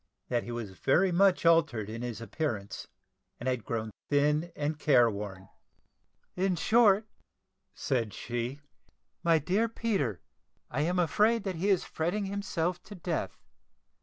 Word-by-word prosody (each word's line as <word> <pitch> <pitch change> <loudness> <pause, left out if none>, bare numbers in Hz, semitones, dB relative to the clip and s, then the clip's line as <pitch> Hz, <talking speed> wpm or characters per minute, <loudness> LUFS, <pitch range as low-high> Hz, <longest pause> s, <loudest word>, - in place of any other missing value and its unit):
That 120 -1 +1
he 120 - -7
was 120 -4 -5
very 180 - +2
much 190 0 +3
altered 160 -11 +3
in 115 +2 -6
his 120 -2 -5
appearance, 115 -3 -4 0.5
and 120 - -5
had 125 -3 0
grown 110 -1 -3 0.2
thin 150 +4 +2
and 150 +1 -2
care 120 -7 +5
worn. 100 -2 -7 0.9
"In 185 0 +1
short," 215 +2 +4 0.7
said 120 -7 -1
she, 120 +6 -4 0.6
"my 165 -2 +5
dear 190 +10 +1
Peter, 195 - -1 0.5
I 135 - -1
am 175 +4 0
afraid 210 +7 +3
that 190 -4 -3
he 195 +5 0
is 190 -3 +3
fretting 180 +6 -2
himself 185 -3 -2
to 205 - -10
death. 170 -2 -3
155 Hz, 140 wpm, -30 LUFS, 120-190 Hz, 0.9 s, care